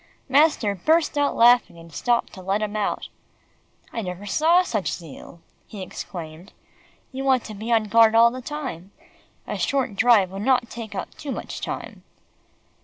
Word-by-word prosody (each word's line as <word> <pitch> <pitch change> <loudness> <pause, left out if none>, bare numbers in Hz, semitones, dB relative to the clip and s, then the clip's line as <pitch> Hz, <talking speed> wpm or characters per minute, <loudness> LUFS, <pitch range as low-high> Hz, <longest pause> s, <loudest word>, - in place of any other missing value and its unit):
Master 275 -6 +3
burst 315 - +1
out 290 -1 +1
laughing, 240 -6 +4
and 165 -1 -14
stopped 240 +6 0
to 190 - -10
let 195 +3 -1
him 210 0 -4
out. 210 -1 -2 0.9
"I 230 - -3
never 180 0 -6
saw 325 - +3
such 215 - -2
zeal," 165 +1 -10 0.3
he 200 -3 -8
exclaimed. 175 -1 -9 0.6
"You 265 0 -5
want 265 -3 +2
to 215 - -8
be 220 +3 -5
on 225 -1 +4
guard 225 +1 +4
all 230 +1 +6
the 255 +1 -7
time. 255 - -6 0.6
A - - -5
short 265 -7 0
drive 210 -4 +4
would 195 +1 -6
not 250 0 +1
take 220 -3 -7
up - - -5
too 290 - -6
much - - -6
time." - - -6
225 Hz, 170 wpm, -23 LUFS, 195-260 Hz, 0.9 s, all